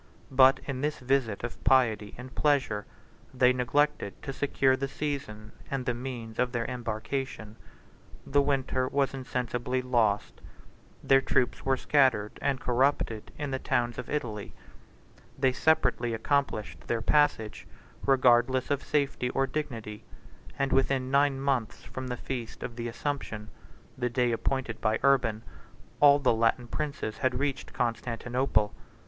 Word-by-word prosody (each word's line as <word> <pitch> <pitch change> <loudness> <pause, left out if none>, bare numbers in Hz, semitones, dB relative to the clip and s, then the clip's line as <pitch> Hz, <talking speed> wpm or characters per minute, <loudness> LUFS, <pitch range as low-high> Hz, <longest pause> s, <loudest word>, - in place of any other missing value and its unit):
62 135 - -13
But 130 0 +7
in 130 -2 -3
this 150 +1 -1
visit 125 -5 0
of 120 - -6
piety 115 -5 +3
and 125 +1 -9
pleasure, 135 -9 +1 0.5
they 125 0 +5
neglected 125 -2 0
to 135 - -4
secure 135 -1 +2
the 135 +1 -2
season, 135 -8 -5 0.2
and 135 -2 -2
the 125 - +1
means 120 -3 -6
of 125 0 +2
their 115 -1 -1
embarkation: 115 -1 -4 0.7
the 145 +1 +3
winter 130 -2 0
was 140 0 0
insensibly 125 -1 -2
lost: 115 -5 0 0.6
their 135 0 +5
troops 125 - 0
were 135 0 +2
scattered 130 -8 +2
and 135 -2 0
corrupted 125 -4 0
in 145 -2 -3
the 130 - -1
towns 120 -1 -1
of 125 - -6
Italy. 115 -9 -4 0.8
They 135 -1 +3
separately 125 -6 +2
accomplished 125 -2 -1
their 115 -1 -1
passage, 140 -7 +1 0.4
regardless 130 0 +3
of 140 -1 +1
safety 140 -4 0
or 135 +1 +1
dignity; 115 -7 -5 0.5
and 135 0 0
within 135 -1 +1
nine 140 -1 +3
months 135 -5 -1
from 130 0 -6
the 125 -1 -3
feast 120 -4 -6
of 120 - -5
the 120 0 -4
Assumption, 115 -3 -4 0.5
the 125 -1 -1
day 125 0 +1
appointed 120 0 -2
by 110 0 +2
Urban, 125 -5 +3 0.6
all 145 -1 +7
the 140 -4 +2
Latin 115 +2 +1
princes 140 -5 -4
had 130 -2 +1
reached 140 0 -2
Constantinople. 120 -1 0
130 Hz, 140 wpm, -28 LUFS, 115-135 Hz, 0.8 s, But